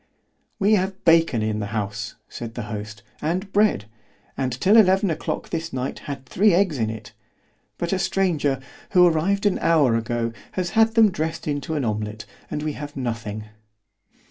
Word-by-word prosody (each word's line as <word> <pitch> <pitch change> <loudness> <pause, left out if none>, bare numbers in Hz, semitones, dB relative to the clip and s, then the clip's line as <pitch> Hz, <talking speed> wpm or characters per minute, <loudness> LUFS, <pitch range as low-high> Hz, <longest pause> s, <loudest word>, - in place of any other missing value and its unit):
——We 210 0 +3
have 190 -1 0
bacon 165 -9 +4
in 110 0 -1
the 105 - -3
house, 105 +1 -4
said 115 -1 -7
the 120 - -4
host, 105 0 -7 0.2
and 185 +5 -2
bread——and 110 - -1
till 195 +8 +4
eleven 190 -3 +5
o'clock 155 - -3
this 165 0 -3
night 130 +1 -3
had 135 -2 -5
three 195 +7 +3
eggs 180 -7 +2
in 110 -1 +1
it——but 110 - -8
a 190 - 0
stranger, 170 -8 +1 0.3
who 180 -2 +7
arrived 180 +5 +2
an 205 - +2
hour 150 -8 +3
ago, 115 0 -1 0.2
has 180 -2 -2
had 225 0 +3
them 220 -3 +6
dressed 160 -1 -3
into 145 +1 -2
an 145 -4 -1
omelet, 105 0 -3 0.2
and 150 - -3
we 155 -1 -2
have 145 0 -8
nothing. 115 -4 -4
150 Hz, 165 wpm, -23 LUFS, 115-185 Hz, 0.3 s, who